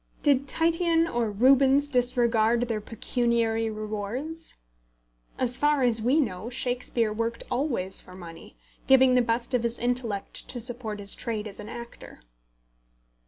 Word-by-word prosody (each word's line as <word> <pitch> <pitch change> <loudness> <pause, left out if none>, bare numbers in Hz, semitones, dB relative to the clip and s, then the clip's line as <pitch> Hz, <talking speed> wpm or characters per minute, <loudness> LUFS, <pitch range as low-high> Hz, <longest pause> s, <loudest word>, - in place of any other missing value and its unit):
Did 280 -2 +3
Titian 330 +2 +2
or 235 -6 -1
Rubens 265 +6 +4
disregard 240 -3 +2
their 220 -2 -2
pecuniary 225 0 0
rewards? 215 +9 -5 0.8
As 250 -1 -1
far 295 -2 +2
as 230 -3 +3
we 255 +7 +3
know, 215 -5 -2
Shakespeare 245 -3 -1
worked 230 +1 -3
always 245 -8 0
for 180 - -13
money, 165 - -12 0.3
giving 265 -1 +6
the 250 - +5
best 235 +2 -1
of 250 - +2
his 235 0 -1
intellect 240 -5 -3
to 245 - -3
support 235 -3 -2
his 200 -1 -3
trade 220 -2 -4
as 200 - -9
an 210 +1 -8
actor. 235 - -10
235 Hz, 140 wpm, -26 LUFS, 220-260 Hz, 0.8 s, giving